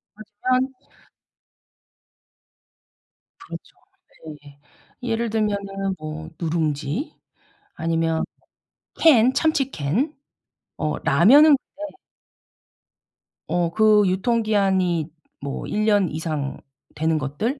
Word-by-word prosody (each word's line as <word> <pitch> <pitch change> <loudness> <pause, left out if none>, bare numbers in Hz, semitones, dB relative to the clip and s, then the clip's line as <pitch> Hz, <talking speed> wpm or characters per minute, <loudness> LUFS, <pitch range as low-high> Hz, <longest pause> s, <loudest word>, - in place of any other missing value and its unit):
맞으면 255 +5 -1 2.7
그렇죠. - - -10 0.7
네. 145 -1 -16 0.4
예를 230 -1 -1
들면은 200 -3 -2
뭐 155 0 -7
누룽지, 160 - -2 0.6
아니면 165 0 0 0.7
캔, 255 -6 +5
참치 285 -4 +1
캔, 200 - -1 0.6
어 155 -1 -2
라면은 280 - +6
근데 300 +4 -10 1.5
어 175 -1 +1
그 215 +1 +5
유통기한이 190 -5 +1 0.3
뭐 140 0 -5
1 215 +1 -1
년 205 -4 +3
이상 155 -3 -3 0.4
되는 160 +1 +1
것들. 155 - -2
195 Hz, 150 characters per minute, -23 LUFS, 160-230 Hz, 2.7 s, 라면은